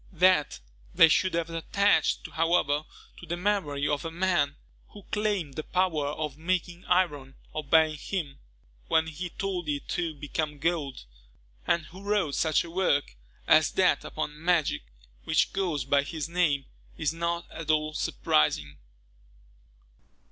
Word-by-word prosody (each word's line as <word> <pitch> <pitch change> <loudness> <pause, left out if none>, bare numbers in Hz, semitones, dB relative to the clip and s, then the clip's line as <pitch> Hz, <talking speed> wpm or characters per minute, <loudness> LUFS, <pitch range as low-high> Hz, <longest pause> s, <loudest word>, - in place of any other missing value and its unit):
That 180 -3 +3 0.4
they 165 - +8
should 185 +3 +2
have 170 0 -1
attached, 200 +5 +1
however, 160 -3 +1 0.3
to - - -10
the 170 +2 -2
memory 175 -8 0
of 145 -1 -1
a 165 - -3
man 170 -4 +1 0.3
who 205 - -13
claimed 205 -9 -1
the 155 - -4
power 175 -6 0
of 150 -1 -4
making 175 +1 -2
iron 145 -7 +1 0.2
obey 155 +1 +3
him 150 -3 -4 0.5
when 160 - +3
he 160 +3 -5
told 180 -3 -3
it 145 -1 -3
to 165 -3 -2
become 150 +1 -3
gold, 145 - -2 0.6
and 170 -2 +2
who 185 +5 -12
wrote 200 -7 0
such 155 0 +2
a 170 - -10
work 155 - +1 0.3
as - - +5
that - - +3
upon 150 +1 -5
magic, 170 -4 +2 0.4
which - - +2
goes 170 -9 -1
by 140 +1 +3
his 150 +2 -4
name, 160 -6 +1 0.3
is 150 - 0
not 170 +1 -2
at 165 -2 -8
all 155 0 +1
surprising. 75 - 0
160 Hz, 140 wpm, -28 LUFS, 145-180 Hz, 0.6 s, they